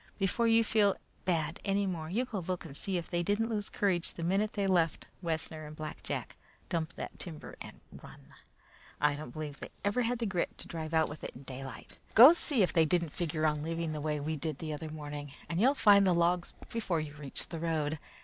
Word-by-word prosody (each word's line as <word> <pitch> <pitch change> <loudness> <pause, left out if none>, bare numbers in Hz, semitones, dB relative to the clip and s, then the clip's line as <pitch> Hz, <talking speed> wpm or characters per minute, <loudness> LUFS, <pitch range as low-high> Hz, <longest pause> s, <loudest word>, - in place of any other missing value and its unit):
Before 205 +4 +2
you 230 0 +5
feel 210 -3 +3 0.3
bad 170 -4 0
any 200 0 +1
more, 165 -4 -3
you 230 +8 0
go 225 -5 -4
look 180 0 -3
and 140 -4 -9
see 190 +4 -2
if 170 - -4
they 175 -1 0
didn't 205 +5 +1
lose 210 -2 -2
courage 185 -4 +1
the 170 - -6
minute 195 +5 +1
they 200 -2 0
left 175 -4 +2 0.2
Wessner 160 -2 -3
and 150 - -9
Black 155 0 -6
Jack, - - -4 0.3
dump 160 -2 -2
that - - -7
timber 165 -5 -7
and - - -9 0.2
run. - - -14 0.7
I 145 0 +3
don't 150 -2 -7
believe 150 +2 -6
they - - -7 0.2
ever 205 +5 +2
had 245 +1 0
the 230 - -2
grit 185 -4 -1
to - - -6
drive 160 -1 -4
out 160 0 +4
with 150 - -9
it - - -5
in 130 - -11
daylight. 135 -1 -8 0.2
Go 260 +8 +11
see 285 - +3
if 180 - +1
they 165 - +5
didn't 170 +1 +1
figure 155 0 -1
on 150 -1 +1
leaving 165 0 -2
the 150 - -4
way 150 0 -1
we 155 +2 -2
did 155 -1 -3
the 155 0 -4
other 155 +1 -5
morning, 145 -2 -6
and 170 +3 -1
you'll 270 +5 +5
find 200 -5 +6
the 180 - +4
logs 175 +1 +1
before 205 -8 -1
you 155 -2 -5
reach 140 -3 -5
the 165 - -5
road. 155 -2 -1
170 Hz, 225 wpm, -32 LUFS, 155-200 Hz, 0.7 s, Go